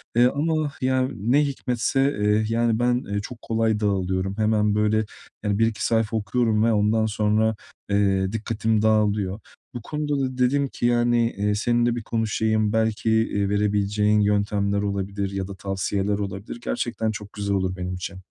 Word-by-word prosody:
Eee, 120 +1 +6
ama 155 +2 0
ya, 130 0 +1
ne 120 +8 +2
hikmetse, 135 0 0
eee, 105 +1 +2
yani, 115 0 +1
ben, 125 +1 +1
eee, 100 0 -1
çok 115 +2 -9
kolay 110 -1 0
dağılıyorum. 95 -1 -1
Hemen 105 -1 +2
böyle, 105 +1 +2 0.4
yani, 105 0 0
bir 115 - +4
iki 105 -3 -3
sayfa 115 -1 +1
okuyorum 110 +1 +1
ve 115 - +3
ondan 105 +1 +2
sonra, 110 +1 +1 0.3
eee, 95 -1 +2
dikkatim 110 0 -1
dağılıyor. 105 -2 +1 0.3
Bu 120 - -6
konuda 150 +1 -2
da 130 -1 -2
dedim 135 +3 +2
ki, 120 - -4
yani, 120 -1 +2
eee, 105 +1 +1
seninle 120 +2 +1
bir 120 - -5
konuşayım, 110 -1 0
belki, 110 0 0
eee, 105 -3 +1
verebileceğin 105 +1 +1
yöntemler 100 -1 +1
olabilir 100 0 -2
ya 95 -1 -3
da 100 - -8
tavsiyeler 95 +1 -2
olabilir. 100 +3 -5
Gerçekten 115 -2 -2
çok 105 -1 -8
güzel 100 -1 -2
olur 95 -1 -1
benim 90 0 -4
için. 90 +1 -6
110 Hz, 165 wpm, -24 LUFS, 100-115 Hz, 0.4 s, Eee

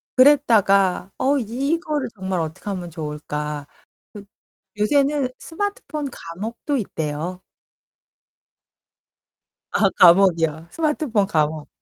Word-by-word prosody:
그랬다가 210 -9 +4
어 280 +2 +2
'이거를 275 - -2
정말 190 -2 -2
어떡하면 175 +2 -5
좋을까?' 150 -2 -5 0.5
그 205 -1 -9 0.5
요새는 275 +4 +2
스마트폰 325 -5 -4
감옥도 225 - -5
있대요. 165 - -4 2.3
아 200 - +3
감옥이요, 170 -3 +5
스마트폰 300 -10 0
감옥. 155 -3 -1
200 Hz, 215 characters per minute, -22 LUFS, 165-275 Hz, 2.3 s, 감옥이요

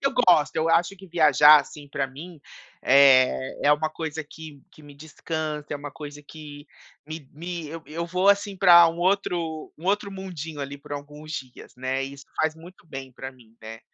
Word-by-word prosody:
Eu 275 0 0
gosto. 180 -11 +3
Eu 160 +1 0
acho 175 +4 +2
que 190 0 -14
viajar 150 -3 +6
assim 145 -1 -12
pra 140 -1 -2
mim, 155 +4 -12 0.4
eh, 130 -1 +4
é 145 - +6
uma 155 +1 -1
coisa 160 -1 -5
que 155 -1 -13
que - - -19
me 145 -1 -14
descansa. 155 0 -5
É - - -2
uma 145 0 -8
coisa 145 0 -10
que 145 -1 -12 0.4
me 155 -3 -9
me 170 +1 -6
eu 165 0 -8
eu 165 +3 -5
vou 185 +3 +1
assim 200 0 +2
pra 175 -3 +7
um 165 +1 -6
outro 175 -4 -1
um 165 - -15
outro 205 +1 0
mundinho 165 -6 -7
ali 140 +1 -6
por 145 +1 -12
alguns 150 +2 -8
dias, 130 -4 -9
né? 130 +1 -2
Isso 140 +1 -10 0.2
faz 155 0 0
muito 165 +2 -16
bem 135 -3 -8
pra 130 +1 -8
mim, 115 -3 -22
né. 110 +1 -10
155 Hz, 195 wpm, -24 LUFS, 140-170 Hz, 0.4 s, pra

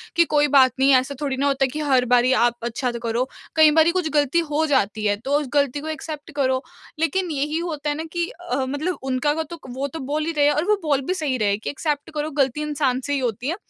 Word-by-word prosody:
कि 335 0 +5
कोई 295 0 +4
बात 260 -1 +6
नहीं, 270 +1 +5
ऐसा 260 +2 +1
थोड़ी 275 -3 -2
ना 280 - +1
होता 275 -1 +1
है - - -1
कि 305 - -4
हर 255 -2 +4
बारी 245 +1 +3 0.2
आप 240 - -3
अच्छा 240 +2 -2
करो। 235 +2 0 0.3
कई 315 -1 +7
बारी 320 +2 +4
कुछ 320 -3 -2
ग़लती 295 +2 +2
हो 305 +2 +1
जाती 215 -7 0
है 205 -1 +2
तो 285 +2 +2
उस 295 - -4
ग़लती 285 -1 +1
को 310 - -7
एक्सेप्ट 310 0 -6
करो। 260 -2 +1 0.4
लेकिन 350 +1 0
यही 295 +2 -1
होता 305 -4 -3
है 290 - -1
ना 320 - -3
कि 345 -1 -1 0.2
अ, - - +2
मतलब 310 +6 -2
उनका 265 +2 0
व 320 +1 -1
तो, 335 +2 -10
वो 265 +3 -3
तो 320 - -8
बोल 295 +3 -2
ही 330 - -1
रहे 290 - +4
हैं 295 - +4
और 305 - 0
वो 425 - +5
बोल 285 -3 +1
भी 365 - 0
सही 295 -8 -1
रहे 205 -2 +1
कि 215 - -5
एक्सेप्ट 290 0 -3
करो, 305 0 -3
ग़लती 275 0 0
इंसान 285 -4 0
से 285 - -1
ही 280 - +1
होती 245 -1 -2
है। 335 - -1
285 Hz, 265 wpm, -22 LUFS, 260-310 Hz, 0.4 s, कई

